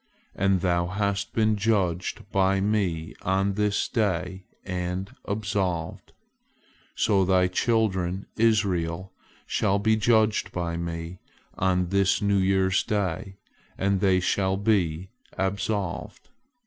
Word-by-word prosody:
As 95 -2 +1
thou 85 -2 +1
hast 100 +1 -1
been 110 -1 +2
judged 100 -4 -1
by 95 0 +2
Me 95 -6 -1
on 95 +1 +1
this 105 0 0
day 95 -3 -1 0.2
and 90 +1 -4
absolved, 100 -5 -2 0.8
so 100 -3 +3
thy 95 0 +3
children 95 -2 0
Israel 95 -6 +1 0.3
shall 95 - +1
be 110 +2 +2
judged 110 -1 +2
by 85 -1 -3
Me 85 +1 -5 0.4
on 90 -1 +1
this 100 0 +2
New 100 -1 +2
Year's 95 0 +2
Day, 95 -2 -2 0.4
and 100 0 +1
they 95 -1 +3
shall 95 +1 0
be 95 -5 0 0.3
absolved." 95 0 -3
95 Hz, 110 wpm, -26 LUFS, 90-100 Hz, 0.8 s, so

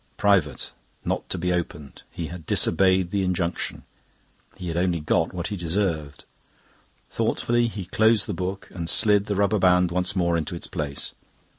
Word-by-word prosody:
"Private. 95 -9 +2 0.3
Not - - -2
to - - -1
be 90 +1 0
opened." 75 -6 -4
He 85 - -5
had 85 -3 -9
disobeyed 95 -2 +3
the 100 - +1
injunction; 90 -2 -1 0.7
he 90 - -7
had 80 - -3
only 85 -1 +1
got 80 +1 +1
what 90 0 -4
he 105 - -3
deserved. 85 -4 -2 0.9
Thoughtfully 120 0 +1
he 105 -5 -5
closed 110 +3 +3
the 105 - -3
book, 95 +2 -4
and 85 -2 -4
slid 105 -2 +5
the 100 - -1
rubber 100 +2 +2
band 90 -1 +4
once 90 +2 0
more 85 -2 +2
into 80 +1 -3
its 85 - -7
place. 75 -5 -4
90 Hz, 165 wpm, -25 LUFS, 85-100 Hz, 0.9 s, slid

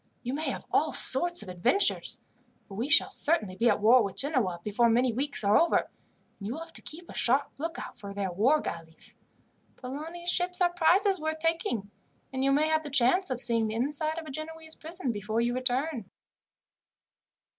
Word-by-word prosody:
You 250 +1 -4
may 310 +3 -2
have - - -6
all - - +1
sorts 345 +6 +5
of - - -13
adventures, 185 - 0 0.4
for - - -12
we 230 +8 -4
shall 330 - +5
certainly 215 - -1
be 235 +4 +2
at 210 - +1
war 235 +4 +5
with 200 -3 -4
Genoa 255 - 0
before 230 +3 +1
many 245 +1 +2
weeks 275 0 -1
are 205 +1 +3
over, 335 - +3
and - - -4 0.6
you 230 - -3
will 320 - -7
have 330 0 -10
to - - -5
keep 340 +3 -9
a - - -11
sharp 270 +4 +1
lookout 330 -4 -6
for 200 -3 -8
their 200 -2 -4
war 240 - +2
galleys. 165 -1 -8 0.6
Polani's 320 +7 -5
ships 360 0 +1
are 350 -1 +2
prizes 370 +3 +2
worth 315 0 -3
taking, 315 -11 -2 0.4
and 260 0 -2
you 275 - +2
may 295 +3 +2
have 315 0 +1
the 300 - -7
chance 280 +8 +3
of 255 - -3
seeing 230 -2 +3
the 215 - -4
inside 295 +6 +1
of 330 - -6
a 305 - -8
Genoese 315 +2 -4
prison 320 -4 -4
before 215 +1 -3
you 240 +1 0
return." 255 -3 -2
270 Hz, 195 wpm, -28 LUFS, 225-320 Hz, 0.6 s, sorts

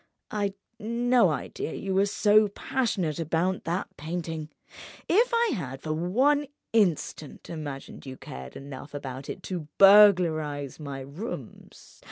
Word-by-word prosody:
I'd 200 -2 -1 0.2
no 235 -1 +3
idea 150 +2 -4
you 195 -1 -3
were 195 +2 +3
so 210 +1 +4
passionate 200 - -1
about 165 +3 0
that 175 +4 -1
painting. 160 -1 -4 0.6
If 460 +8 +3
I 470 -2 +2
had 135 - -5
for 155 - -2
one 260 - +2 0.3
instant 175 -9 0
imagined 145 -4 -7
you 130 0 -7
cared 65 0 -9
enough 140 +1 -9
about 135 -1 -6
it 185 - -6
to 175 -5 -5
burglarize 170 -9 +5
my 140 -3 -6
rooms 150 - -9
175 Hz, 130 wpm, -27 LUFS, 145-210 Hz, 0.6 s, burglarize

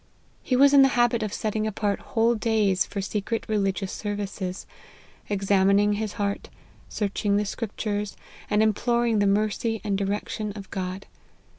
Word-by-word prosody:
He 255 - 0
was 280 +2 +6
in 280 - +8
the 270 - +7
habit 240 -1 +3
of 215 -2 -2
setting 215 +1 -2
apart 205 -1 -1
whole 230 +1 +1
days 215 -4 +1
for 200 - -4
secret 210 +3 -3
religious 195 -3 -1
services, 200 -3 -4 0.6
examining 200 +1 +3
his 210 0 -3
heart, 200 -1 -3 0.4
searching 200 0 0
the 210 - 0
scriptures, 210 -1 -3 0.3
and 210 +1 +3
imploring 235 +1 +2
the 205 - +3
mercy 215 +2 0
and 205 -2 0
direction 205 +1 -2
of 200 -2 -10
God. 185 0 -4
210 Hz, 145 wpm, -25 LUFS, 200-220 Hz, 0.6 s, in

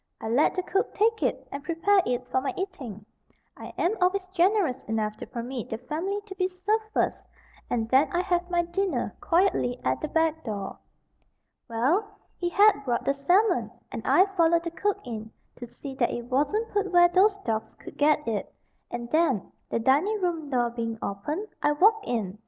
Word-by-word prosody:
I 220 - -5
let 250 +6 +3
the 370 - -1
cook 385 +2 -1
take 445 +1 +2
it - - -1
and 280 0 -6
prepare 355 +5 +3
it 250 0 -2
for 260 - +2
my 270 - -3
eating. 260 - -6 0.5
I - - -9
am 370 +6 +1
always 370 +1 +2
generous 365 -6 +2
enough 215 -1 -1
to - - -8
permit 240 0 -5
the 225 - -3
family 320 - -3
to 400 - -8
be 370 -1 0
served 405 +4 -1
first - - 0 0.5
and 225 -2 0
then 265 +5 +4
I 350 - +1
have 355 -1 -1
my 345 -1 +2
dinner 375 +3 -1
quietly 335 -9 +2
at - - 0
the 310 - -2
back 320 0 +1
door. 205 -4 -5 0.9
Well, 345 - 0 0.2
he 350 - 0
had 405 -1 +5
brought 245 -2 -1
the 275 - +2
salmon, 360 +10 +2 0.2
and - - -4
I 375 - +5
followed 335 -1 +4
the 335 - -4
cook 390 +4 0
in, 220 -2 -6 0.3
to 245 - -8
see 270 +3 -9
that 255 -3 +1
it 240 - -4
wasn't 300 - 0
put 405 -2 0
where 350 -1 +7
those 390 +3 +4
dogs 220 -1 -2
could - - -11
get 300 -1 +2
it; 220 -3 -2 0.4
and 240 0 -5
then, 310 - +1 0.2
the - - 0
dining 290 - +2
room 335 -5 -2
door 240 -3 +1
being 230 -1 -3
opened, 295 - -3
I 295 - +3
walked 420 +7 +4
in. 215 -4 -2
320 Hz, 190 wpm, -27 LUFS, 245-375 Hz, 0.9 s, where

